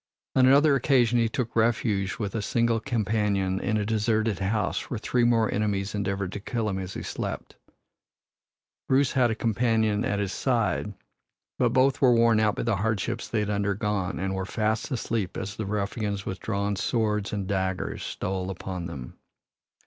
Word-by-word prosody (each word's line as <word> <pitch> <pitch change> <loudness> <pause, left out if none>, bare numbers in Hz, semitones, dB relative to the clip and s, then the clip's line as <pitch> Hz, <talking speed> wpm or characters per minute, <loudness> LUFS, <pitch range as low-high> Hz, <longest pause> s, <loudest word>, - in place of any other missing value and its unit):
On 130 -1 +6
another 140 +3 +6
occasion 125 -3 +3
he 115 -1 +2
took 120 0 -3
refuge 110 -4 +1
with 105 -3 -3
a 115 - -1
single 115 +2 +1
companion 105 -5 0
in 110 - 0
a 105 - -1
deserted 110 -1 +1
house 100 +2 -1
where 120 - -2
three 120 +3 0
more 115 -2 +3
enemies 100 -1 -1
endeavored 100 -2 -2
to 105 - -5
kill 115 +2 -2
him 95 -1 -2
as 95 0 -6
he - - -5
slept. - - -5 1.3
Bruce 135 0 +3
had 125 -3 +3
a 110 - -1
companion 110 -2 +1
at 100 -3 0
his 100 -2 -2
side, 115 -4 0 0.6
but - - +4
both 130 +1 +2
were 125 -3 +6
worn 115 -1 +4
out 105 -1 +2
by - - -2
the 115 -4 +1
hardships 105 0 -1
they 110 - 0
had 105 0 -1
undergone 100 -1 -1
and 95 +1 -2
were 95 0 -2
fast 110 +4 -1
asleep 115 -7 -2
as 100 - -4
the 110 - -4
ruffians 100 0 -2
with 95 - -4
drawn 100 -1 -1
swords 105 0 0
and 100 -2 -2
daggers 95 -1 -2
stole 95 -1 -3
upon 90 -1 -5
them. 65 -6 -9
105 Hz, 175 wpm, -26 LUFS, 100-115 Hz, 1.3 s, On